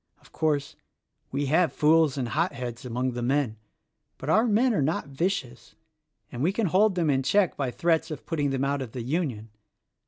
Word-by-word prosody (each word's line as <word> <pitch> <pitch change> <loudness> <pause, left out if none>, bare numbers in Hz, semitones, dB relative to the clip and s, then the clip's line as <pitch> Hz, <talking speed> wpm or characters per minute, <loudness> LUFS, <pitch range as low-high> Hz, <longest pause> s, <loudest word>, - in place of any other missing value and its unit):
Of - - -22
course, 145 -3 -1 0.6
we 140 +2 -1
have 160 +4 +3
fools 155 -2 +3
and 125 -3 -2
hotheads 125 -5 -2
among 125 +1 -1
the 120 0 -5
men; 125 -2 0 0.6
but 145 - -3
our 220 +5 +4
men 235 +3 +3
are 195 - +1
not 145 +1 -1
vicious 140 -5 -3 0.6
and 120 - -6
we 165 +6 +2
can 215 +2 -1
hold 190 +3 +3
them 165 -4 +2
in 135 -1 +2
check 185 +7 +2
by 135 -3 -2
threats 165 +5 0
of 155 -5 -7
putting 145 -4 -1
them 135 0 -1
out 140 0 -1
of 120 -4 -7
the 125 - -4
Union. 125 -6 -2
145 Hz, 190 wpm, -26 LUFS, 130-170 Hz, 0.6 s, our